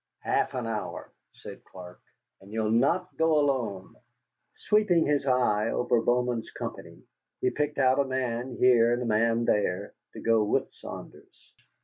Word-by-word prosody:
"Half -, -, 0 dB
an 125 Hz, -2 st, -3 dB
hour," 110 Hz, -2 st, -5 dB, 0.2 s
said -, -, -12 dB
Clark, 90 Hz, -1 st, -13 dB, 0.4 s
"and 95 Hz, +1 st, -16 dB
you'll 110 Hz, -1 st, -1 dB
not 165 Hz, +11 st, +1 dB
go 160 Hz, -1 st, +3 dB
alone." 125 Hz, -10 st, -1 dB, 0.6 s
Sweeping 210 Hz, -6 st, +2 dB
his 145 Hz, -1 st, 0 dB
eye 115 Hz, -4 st, +2 dB
over 120 Hz, -1 st, +1 dB
Bowman's 120 Hz, -1 st, 0 dB
company, -, -, -8 dB, 0.4 s
he -, -, +1 dB
picked 150 Hz, 0 st, -2 dB
out 130 Hz, 0 st, +3 dB
a 140 Hz, -, +3 dB
man 125 Hz, -1 st, -3 dB
here 120 Hz, -2 st, +5 dB
and 120 Hz, +1 st, -1 dB
a -, -, -4 dB
man 115 Hz, +1 st, +1 dB
there 100 Hz, -2 st, 0 dB, 0.2 s
to -, -, -9 dB
go 115 Hz, -1 st, +2 dB
with 105 Hz, -, -1 dB
Saunders. -, -, -12 dB
120 Hz, 150 wpm, -27 LUFS, 110-135 Hz, 0.6 s, here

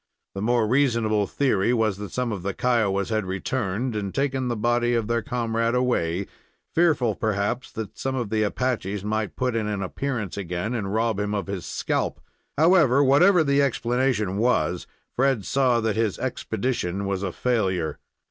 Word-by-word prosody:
The 95 Hz, -, -5 dB
more 115 Hz, 0 st, +2 dB
reasonable 115 Hz, -5 st, +2 dB
theory 120 Hz, -4 st, +1 dB
was 110 Hz, -4 st, +1 dB
that 105 Hz, -1 st, -6 dB
some 125 Hz, +4 st, -2 dB
of 100 Hz, -4 st, -4 dB
the 100 Hz, +1 st, -3 dB
Kiowas 105 Hz, -6 st, +1 dB
had 110 Hz, -1 st, 0 dB
returned 105 Hz, +4 st, -2 dB
and 100 Hz, -2 st, -3 dB
taken 135 Hz, -2 st, 0 dB
the 120 Hz, -, -1 dB
body 120 Hz, +2 st, +1 dB
of 115 Hz, -2 st, 0 dB
their 115 Hz, +1 st, 0 dB
comrade 115 Hz, -2 st, -1 dB
away, 100 Hz, -8 st, 0 dB, 0.5 s
fearful, 155 Hz, -10 st, +3 dB
perhaps, 110 Hz, +4 st, -2 dB
that 110 Hz, -3 st, -6 dB
some 135 Hz, 0 st, -2 dB
of 120 Hz, -5 st, -3 dB
the 110 Hz, -1 st, +1 dB
Apaches 105 Hz, -3 st, -1 dB
might 110 Hz, 0 st, -2 dB
put 125 Hz, -2 st, -1 dB
in 110 Hz, -2 st, 0 dB
an 105 Hz, -2 st, -2 dB
appearance 110 Hz, -1 st, -3 dB
again 90 Hz, +4 st, -3 dB
and 100 Hz, -5 st, -2 dB
rob 110 Hz, -1 st, 0 dB
him 105 Hz, 0 st, -1 dB
of 100 Hz, -, -2 dB
his 100 Hz, -2 st, -5 dB
scalp. -, -, -2 dB, 0.4 s
However, 155 Hz, -4 st, +5 dB
whatever 165 Hz, +6 st, +5 dB
the 140 Hz, -1 st, +3 dB
explanation 120 Hz, -6 st, 0 dB
was, 110 Hz, -, +1 dB, 0.3 s
Fred 130 Hz, -5 st, +1 dB
saw 130 Hz, -3 st, +2 dB
that 110 Hz, -2 st, 0 dB
his 110 Hz, -3 st, 0 dB
expedition 110 Hz, -6 st, -2 dB
was 100 Hz, -1 st, -2 dB
a 95 Hz, -2 st, -2 dB
failure. 95 Hz, -10 st, -1 dB
115 Hz, 170 wpm, -24 LUFS, 100-125 Hz, 0.5 s, However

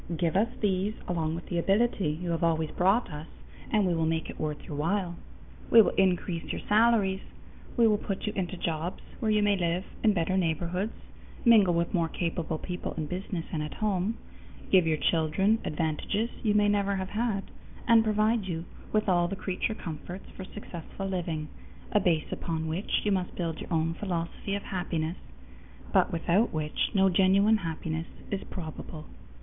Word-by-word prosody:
Give 170 Hz, -1 st, 0 dB
us 205 Hz, +4 st, +4 dB
these 200 Hz, +1 st, +1 dB
along 160 Hz, -2 st, -1 dB
with 170 Hz, -, -6 dB
the 175 Hz, -, -1 dB
ability 195 Hz, -1 st, +2 dB
you 175 Hz, -, -1 dB
have 165 Hz, 0 st, -1 dB
always 160 Hz, -2 st, +1 dB
brought 195 Hz, +4 st, +2 dB
us, 150 Hz, +2 st, -7 dB, 0.4 s
and 210 Hz, -3 st, +3 dB
we 180 Hz, -, +2 dB
will 165 Hz, -1 st, +1 dB
make 160 Hz, 0 st, -1 dB
it -, -, -13 dB
worth 150 Hz, -1 st, -3 dB
your 150 Hz, -, -6 dB
while. 175 Hz, +4 st, 0 dB, 0.5 s
We 230 Hz, -, +8 dB
will -, -, +1 dB
increase 180 Hz, -2 st, +1 dB
your -, -, -4 dB
salaries. 210 Hz, -3 st, +4 dB, 0.6 s
We 235 Hz, -, +6 dB
will 210 Hz, -2 st, +4 dB
put 195 Hz, -3 st, -3 dB
you 210 Hz, -, -2 dB
into 185 Hz, -1 st, -2 dB
jobs 170 Hz, +1 st, -3 dB, 0.2 s
where 220 Hz, -, 0 dB
you 210 Hz, -1 st, +3 dB
may 205 Hz, -1 st, +4 dB
live 175 Hz, 0 st, 0 dB, 0.2 s
in 215 Hz, -2 st, +5 dB
better 185 Hz, +1 st, +1 dB
neighborhoods, 180 Hz, +4 st, 0 dB, 0.5 s
mingle 210 Hz, -7 st, +6 dB
with 170 Hz, 0 st, 0 dB
more 170 Hz, -3 st, +2 dB
capable 165 Hz, -2 st, -2 dB
people 180 Hz, +2 st, -5 dB
in 155 Hz, -, -1 dB
business 180 Hz, +1 st, -4 dB
and 155 Hz, -, 0 dB
at 150 Hz, -, -5 dB
home, 210 Hz, +1 st, 0 dB, 0.5 s
give 185 Hz, -4 st, +6 dB
your 155 Hz, -1 st, +2 dB
children 170 Hz, +8 st, +2 dB
advantages 165 Hz, +9 st, -1 dB
you 210 Hz, -2 st, +2 dB
may 210 Hz, 0 st, +5 dB
never 200 Hz, -1 st, +2 dB
have 190 Hz, 0 st, -3 dB
had, 215 Hz, -2 st, 0 dB, 0.4 s
and 230 Hz, -2 st, +7 dB
provide 215 Hz, 0 st, +2 dB
you 165 Hz, -2 st, -3 dB, 0.3 s
with 215 Hz, -1 st, +1 dB
all 175 Hz, -2 st, +3 dB
the 195 Hz, -, -3 dB
creature 195 Hz, +3 st, -2 dB
comforts 175 Hz, +3 st, -7 dB
for 190 Hz, -, -7 dB
successful 195 Hz, -1 st, -7 dB
living, 170 Hz, -5 st, -2 dB, 0.4 s
a 210 Hz, -, +4 dB
base 165 Hz, -5 st, +1 dB
upon 160 Hz, -1 st, -2 dB
which 165 Hz, +6 st, -1 dB
you 210 Hz, -, +1 dB
must 185 Hz, -2 st, -1 dB
build 165 Hz, -3 st, -2 dB
your -, -, -8 dB
own 165 Hz, 0 st, +1 dB
philosophy 175 Hz, +1 st, -3 dB
of 200 Hz, -, -4 dB
happiness, 175 Hz, -2 st, -2 dB, 0.8 s
but -, -, +4 dB
without 175 Hz, +6 st, +2 dB
which 155 Hz, -1 st, -1 dB
no 195 Hz, -1 st, +5 dB
genuine 195 Hz, +4 st, +5 dB
happiness 165 Hz, -2 st, -3 dB, 0.2 s
is 200 Hz, -1 st, -2 dB
probable. 160 Hz, -2 st, -7 dB
185 Hz, 180 wpm, -29 LUFS, 165-205 Hz, 0.8 s, We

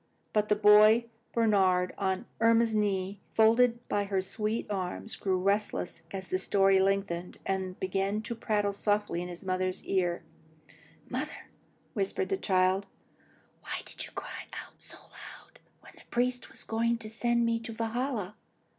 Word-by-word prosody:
But 210 Hz, 0 st, +1 dB
the 210 Hz, -, +4 dB
boy 210 Hz, +2 st, +7 dB, 0.3 s
Bernhard, 190 Hz, -5 st, +3 dB
on 190 Hz, +3 st, -1 dB
Irma's 230 Hz, 0 st, +4 dB
knee, 200 Hz, -2 st, 0 dB
folded 235 Hz, +2 st, +4 dB
by 205 Hz, 0 st, 0 dB
her 195 Hz, -1 st, 0 dB
soft 210 Hz, +4 st, -1 dB
arm, 185 Hz, -3 st, -3 dB
grew 190 Hz, -2 st, +1 dB
restless 200 Hz, 0 st, -1 dB
as 190 Hz, -1 st, -6 dB
the 185 Hz, -, 0 dB
story 195 Hz, 0 st, +4 dB
lengthened, 190 Hz, -2 st, 0 dB
and 190 Hz, -1 st, -2 dB
began 195 Hz, +3 st, -1 dB
to 230 Hz, -, -3 dB
prattle 210 Hz, -3 st, 0 dB
softly 205 Hz, -3 st, 0 dB
at 180 Hz, -, -5 dB
his 175 Hz, +2 st, -9 dB
mother's 185 Hz, 0 st, -1 dB
ear. 175 Hz, -3 st, 0 dB, 0.8 s
"Mother," -, -, -5 dB, 0.4 s
whispered 205 Hz, -, -1 dB
the 390 Hz, -, +1 dB
child, 190 Hz, -, +2 dB, 0.7 s
"why -, -, -5 dB
did -, -, -6 dB
you -, -, -9 dB
cry -, -, -7 dB, 0.2 s
out -, -, -22 dB
so -, -, -11 dB
loud, -, -, -14 dB, 0.2 s
when -, -, -15 dB
the -, -, -16 dB
priest 250 Hz, +1 st, -1 dB
was -, -, -9 dB
going 230 Hz, +1 st, 0 dB
to 220 Hz, -, -8 dB
send 235 Hz, +1 st, +1 dB
me 230 Hz, 0 st, +1 dB
to 230 Hz, 0 st, -7 dB
Valhalla?" 225 Hz, -2 st, -2 dB
205 Hz, 155 wpm, -30 LUFS, 190-225 Hz, 0.8 s, boy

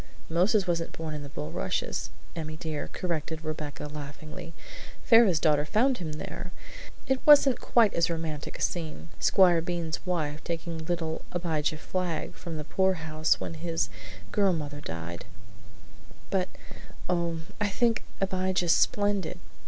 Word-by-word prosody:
"Moses 185 Hz, +5 st, +3 dB
wasn't 170 Hz, -2 st, -1 dB
born 160 Hz, -1 st, -5 dB
in 150 Hz, -, -4 dB
the 140 Hz, -, -7 dB
bulrushes, 80 Hz, -, -2 dB, 0.3 s
Emmy 155 Hz, -1 st, -4 dB
dear," 155 Hz, -2 st, -3 dB
corrected 160 Hz, -2 st, -3 dB
Rebecca 150 Hz, -2 st, -4 dB
laughingly. 150 Hz, +2 st, -7 dB, 0.5 s
"Pharaoh's 225 Hz, -8 st, +6 dB
daughter 150 Hz, -2 st, +4 dB
found 240 Hz, -, +2 dB
him 160 Hz, -4 st, -4 dB
there. 180 Hz, +4 st, -6 dB, 0.5 s
It 265 Hz, -1 st, +2 dB
wasn't 285 Hz, -3 st, +7 dB
quite 225 Hz, -4 st, +4 dB
as 170 Hz, 0 st, +2 dB
romantic 160 Hz, -3 st, -3 dB
a -, -, -2 dB
scene 165 Hz, -1 st, -2 dB
Squire 175 Hz, -3 st, +5 dB
Bean's 170 Hz, -1 st, -2 dB
wife 155 Hz, -4 st, -2 dB
taking 170 Hz, -1 st, -3 dB
little 165 Hz, -2 st, -1 dB
Abijah 160 Hz, -3 st, 0 dB
Flagg 175 Hz, 0 st, -2 dB
from 165 Hz, -3 st, -6 dB
the 150 Hz, -, -4 dB
poorhouse 160 Hz, -3 st, +1 dB
when -, -, -4 dB
his 165 Hz, -, -1 dB, 0.4 s
girl 200 Hz, -2 st, +3 dB
mother 145 Hz, -3 st, -4 dB
died, 85 Hz, -, -5 dB, 1.1 s
but, 185 Hz, -2 st, +1 dB, 0.6 s
oh, 170 Hz, -2 st, 0 dB, 0.2 s
I 210 Hz, -, +2 dB
think 230 Hz, +2 st, +2 dB, 0.2 s
Abijah's 185 Hz, -2 st, +2 dB
splendid! 205 Hz, -, +1 dB
165 Hz, 135 wpm, -29 LUFS, 155-185 Hz, 1.1 s, wasn't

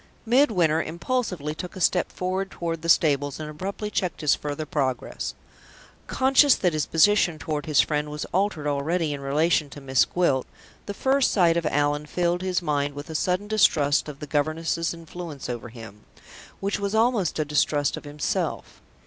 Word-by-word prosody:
Midwinter 205 Hz, -, +3 dB
impulsively 170 Hz, -, -2 dB
took 175 Hz, +4 st, -7 dB
a -, -, -7 dB
step 180 Hz, 0 st, +2 dB
forward 185 Hz, +1 st, -2 dB
toward 165 Hz, -3 st, -4 dB
the 165 Hz, -, -4 dB
stables, 145 Hz, -3 st, +2 dB
and 155 Hz, -, -5 dB
abruptly 195 Hz, +7 st, -5 dB
checked 180 Hz, -6 st, -2 dB
his 150 Hz, -, +4 dB
further 150 Hz, +1 st, -4 dB
progress. 135 Hz, -4 st, -3 dB, 0.7 s
Conscious 270 Hz, +1 st, +4 dB
that 180 Hz, -3 st, 0 dB
his 155 Hz, -1 st, -1 dB
position 175 Hz, 0 st, +3 dB
toward 150 Hz, +1 st, -4 dB
his 150 Hz, -2 st, +5 dB
friend 150 Hz, -1 st, -1 dB
was 150 Hz, 0 st, -5 dB
altered 190 Hz, -5 st, 0 dB
already 150 Hz, +2 st, 0 dB
in 140 Hz, -, -6 dB
relation 150 Hz, +2 st, +1 dB
to 145 Hz, -, -10 dB
Miss 135 Hz, -1 st, +2 dB
Gwilt, 145 Hz, -8 st, 0 dB, 0.4 s
the 205 Hz, -, -4 dB
first 270 Hz, +3 st, +2 dB
sight 170 Hz, -4 st, +3 dB
of 170 Hz, -2 st, 0 dB
Allan 145 Hz, +1 st, 0 dB
filled 175 Hz, +2 st, 0 dB
his 185 Hz, -1 st, -1 dB
mind 145 Hz, -2 st, -1 dB
with 145 Hz, +3 st, -7 dB
a -, -, -5 dB
sudden 180 Hz, +5 st, 0 dB
distrust 155 Hz, -9 st, +3 dB
of 145 Hz, -, -8 dB
the -, -, -6 dB
governess's 155 Hz, +3 st, -1 dB
influence 165 Hz, -3 st, -8 dB
over 120 Hz, -1 st, -5 dB
him, 110 Hz, -3 st, -11 dB, 0.6 s
which 200 Hz, +1 st, -1 dB
was 200 Hz, +1 st, -2 dB
almost 225 Hz, -6 st, +2 dB
a 155 Hz, -, 0 dB
distrust 145 Hz, -1 st, +1 dB
of -, -, -9 dB
himself. 145 Hz, 0 st, -3 dB
160 Hz, 175 wpm, -25 LUFS, 145-185 Hz, 0.7 s, his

